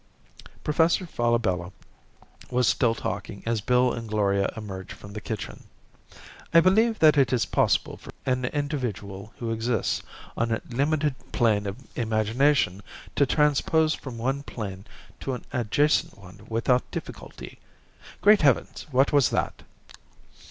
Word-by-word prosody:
Professor 165 +4 +2
Falabella 115 - 0 0.8
was 125 -1 +2
still 115 -2 +2
talking 100 0 -5
as 115 -2 0
Bill 125 +3 +3
and 115 -2 -6
Gloria 100 -2 +1
emerged 95 -4 -7
from 100 0 -12
the 105 - -6
kitchen. 110 -1 -6 0.9
"I 165 - +7
believe 215 +6 +4
that 155 -2 +5
it 135 - +3
is 120 -5 +2
possible - - +1
for - - -11
an 130 -1 0
individual 120 -9 -4
who 115 -2 -3
exists 115 -1 0 0.3
on 115 0 0
a 110 - -2
limited 145 +3 0 0.2
plane 105 -4 +2
of 100 +2 -4 0.2
imagination 110 -1 +1 0.3
to 140 - +3
transpose 155 +2 +2
from 130 -6 -7
one 135 +4 -1
plane 100 -7 -7 0.3
to 135 - -3
an - - -10
adjacent 140 +4 +1
one 100 +2 -14
without 115 +3 +1
difficulty... - - -8 0.6
Great 210 0 +7
Heavens, 140 0 +1
what 135 +1 +2
was 140 -4 +5
that?" - - -2
120 Hz, 135 wpm, -26 LUFS, 105-145 Hz, 0.9 s, I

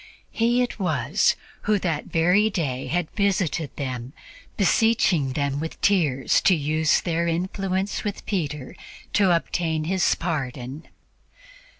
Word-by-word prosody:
He 240 +2 +2
it 245 - -5
was 155 -7 +1 0.3
who 210 0 +3
that 170 -6 -2
very 180 +6 +3
day 140 -10 -2
had 175 -1 -1
visited 185 -7 0
them, 130 -2 -5 0.4
beseeching 195 - +2
them 140 0 -1
with 160 +1 -5
tears 155 -10 +2
to 185 - +4
use 155 0 +1
their 170 -1 -1
influence 190 +3 -2
with 205 -1 -4
Peter 150 -9 -3 0.4
to 200 -2 +4
obtain 165 -1 -1
his 185 +3 +2
pardon. 140 -3 -4
165 Hz, 120 wpm, -24 LUFS, 145-195 Hz, 0.4 s, to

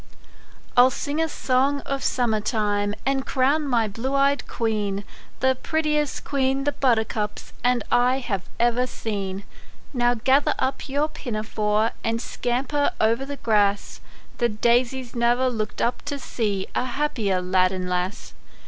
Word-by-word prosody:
I'LL 250 +1 +7
sing 290 +4 -2
a 325 - +1
song 275 +1 +1
of 275 0 -3
summer 235 -4 +1
time, 205 -1 0
And 270 0 +1
crown 280 +4 +1
my 235 -4 +2
blue 230 +7 -3
eyed 280 +1 +2
queen, 210 -3 -1 0.4
The 260 0 +4
prettiest 300 +1 -1
queen 270 -1 0
the 290 - +1
buttercups 220 -6 -1
And 245 -1 +2
I 250 +2 +4
have 220 -8 -2 0.2
ever 240 +1 +2
seen. 200 -5 -4 0.5
Now 245 -1 +2
gather 265 +5 +3
up 265 +2 -2
your 285 +3 +1
pinafore, 220 -6 -1
And 230 0 0
scamper 255 +5 -1
o'er 220 +1 +4
the 275 +2 -6
grass; 205 -4 +1 0.4
The 240 - +3
daisies 240 +3 +1
ne'er 240 +2 +2
looked 215 -2 -3
up 240 +1 0
to 285 -1 -3
see 210 -7 -2
A - - 0
happier 240 -8 0
lad 185 0 +2
arid 185 -1 -3
lass. 180 +3 -3
245 Hz, 145 wpm, -24 LUFS, 215-270 Hz, 0.5 s, I'LL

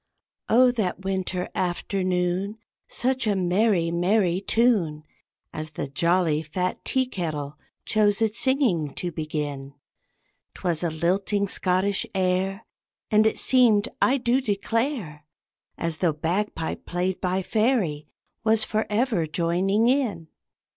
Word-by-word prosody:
Oh, 250 +2 +6
that 205 -6 -2
winter 190 -1 -2
afternoon, 185 +2 -1 0.3
Such 255 -1 0
a 205 - +2
merry, 185 -1 +2
merry 180 +1 +2
tune 200 -9 +1 0.5
As 155 0 -5
the 145 - -4
jolly, 165 +2 +1
fat 180 +4 -3
tea 260 -1 +1
kettle 155 - -4 0.3
chose 205 -2 +2
its 220 -1 +1
singing 230 - +1
to 175 - -3
begin! 145 -3 -4 0.8
'Twas 170 -4 -2
a 170 - 0
lilting 190 +5 0
Scottish 190 +1 0
air, 190 +1 0 0.5
And 215 0 +5
it - - 0
seemed, 240 -3 +3
I 265 - +4
do 250 +1 +1
declare, 220 - -2 0.5
As 165 -1 -2
though 170 -3 +1
bagpipe 165 +2 -3
played 180 +1 -2
by 185 +1 0
fairy 210 - 0 0.4
was 220 0 +3
forever 215 -4 0
joining 180 +7 +1
in. 225 - 0
185 Hz, 120 wpm, -25 LUFS, 170-220 Hz, 0.8 s, Oh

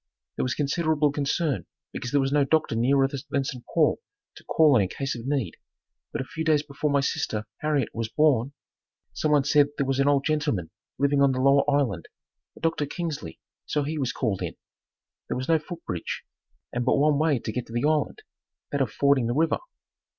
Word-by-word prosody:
There - - -1
was 125 - -1
considerable 150 0 +1
concern 145 0 -1 0.3
because 125 - -4
there 140 +2 +2
was 135 0 0
no 145 0 +4
doctor 155 -4 +1
nearer 135 +4 +3
than 140 0 -3
St. 125 -2 -6
Paul 160 -3 +3 0.3
to - - -15
call 155 -4 +4
on 115 - +5
in 95 - +1
case 135 +4 -3
of 120 +1 -7
need, 135 - -1 0.5
but - - -2
a - - -5
few 160 +4 -5
days 155 -2 +3
before 145 0 -2
my 140 -1 +3
sister, 110 -5 -2
Harriet 150 -5 0
was 115 -1 -3
born, 140 -3 +2 0.6
someone 150 -2 +2
said 145 0 +4
there 140 - +1
was 135 0 0
an 140 - +3
old 140 -1 +3
gentleman 145 - 0 0.3
living 140 0 +2
on 140 -1 +4
the 130 - -2
lower 140 +1 +5
island, 130 - 0 0.5
a - - -11
Doctor 160 -3 0
Kingsley, 160 -2 -5 0.3
so 150 - 0
he 155 +2 -3
was 130 -3 0
called 110 -9 -2
in. - - -4 0.7
There - - -2
was 130 - -4
no 165 -1 +4
foot 170 +2 -9
bridge 85 -2 -4 0.5
and 120 - -1
but 125 - +3
one 145 0 +3
way 155 -3 +3
to 110 - -4
get 125 +2 -4
to 115 - -11
the 120 +3 0
island, 155 - 0 0.5
that 145 - 0
of 125 -5 0
fording 140 -4 +2
the 120 - -1
river. 160 +2 +2
140 Hz, 205 wpm, -26 LUFS, 130-150 Hz, 0.7 s, on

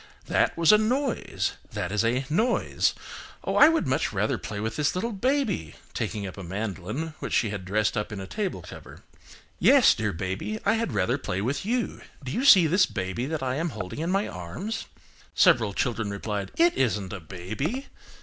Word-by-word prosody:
That - - +1
was 165 +1 +6
a 210 - +7
noise, 255 +4 -1 0.2
that 85 - -3
is 105 +2 +1
a 125 +4 +1
noise. 220 - +1 0.5
Oh! - - -2
I 300 - +8
would 325 - +1
much 130 +3 0
rather 105 +1 0
play 105 - -5
with 110 +1 -3
this 145 +2 0
little 230 +6 -1
baby 230 - -1 0.2
(taking 105 -2 -3
up 95 +1 -7
a - - -6
mandolin 105 - -4
which - - -5
she 110 - +2
had 100 -3 -5
dressed 105 +4 +1
up 105 0 -2
in 105 - -5
a 95 - -5
table 195 - -3
cover). - - -12 0.6
Yes, 275 -3 +6
dear 105 -2 -1
baby, 95 - -4
I 200 - +4
had 225 - -1
rather 95 -3 +1
play 90 - -3
with 140 - -2
you. 240 0 -1 0.2
Do 130 - -5
you 255 - -1
see 190 -11 +8
this 185 +4 +4
baby 95 +6 -3
that 155 -2 -3
I 130 0 -1
am 165 +2 -1
holding 105 -2 -6
in 165 +2 -1
my 195 +2 +1
arms?" 90 - -5 0.5
Several 110 -4 +5
children 115 0 -1
replied, 100 0 -4
"It 340 +1 +5
isn't 105 -7 0
a 100 - -5
baby." 105 - -4
125 Hz, 195 wpm, -26 LUFS, -, 0.6 s, I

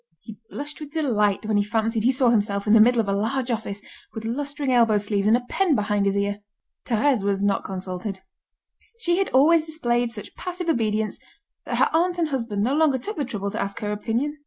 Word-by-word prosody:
He 215 +5 -12
blushed 290 +1 -7
with 300 -1 -9
delight 215 -10 +1
when 215 -1 +1
he 205 - +3
fancied 225 +1 -1
he 250 - +4
saw 260 -1 +3
himself 205 -3 0
in 210 - +3
the 225 - +7
middle 240 +2 +5
of 220 - +1
a 200 - +1
large 240 +5 -1
office, 210 -3 -4 0.3
with 220 - -5
lustring 280 +3 -2
elbow 230 -3 +4
sleeves, 205 0 0
and 225 +2 +5
a 245 - -7
pen 370 -2 +1
behind 205 -2 0
his 195 0 +1
ear. 200 0 -1 0.5
Thérèse 240 -1 +2
was 200 0 0
not 200 -1 +1
consulted: 190 +1 -5 0.8
she 345 -6 0
had 390 - 0
always 310 +5 +5
displayed 245 -7 0
such 220 -3 -8
passive 360 -1 -5
obedience 220 -5 0 0.5
that - - -2
her - - +3
aunt 350 +2 +2
and 330 -3 0
husband 230 -7 -2
no 255 +5 +1
longer 300 -3 +3
took 415 - -5
the 295 - -1
trouble 200 -5 -4
to - - -3
ask 200 0 -3
her 210 -1 -2
opinion. 240 +8 -2
230 Hz, 215 wpm, -24 LUFS, 205-285 Hz, 0.8 s, the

